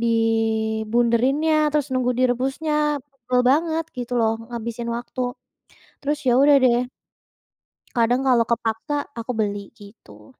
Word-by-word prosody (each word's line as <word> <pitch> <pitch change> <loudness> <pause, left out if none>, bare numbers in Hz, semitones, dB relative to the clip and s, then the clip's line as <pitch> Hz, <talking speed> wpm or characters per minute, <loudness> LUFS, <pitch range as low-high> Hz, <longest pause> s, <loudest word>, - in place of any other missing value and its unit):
di 235 - 0 0.8
bunderinnya, 250 +7 +2 0.2
terus 295 -2 +1
nunggu 250 -1 +1
direbusnya, 260 +5 0 0.4
tebel 250 -1 -1
banget 320 +3 +1
gitu 245 0 -5
loh, 220 0 +2 0.2
ngabisin 235 0 -5
waktu. 245 +2 -7 0.8
Terus 295 +1 -1
ya - - +5
udah 285 0 +6
deh, 240 -1 +4 1.2
kadang 240 +2 +2
kalau 240 -3 +4
kepaksa, 230 +5 -1 0.2
aku 230 +2 -4
beli, 205 -2 -2
gitu. 205 +6 -16
245 Hz, 120 wpm, -22 LUFS, 230-275 Hz, 1.2 s, udah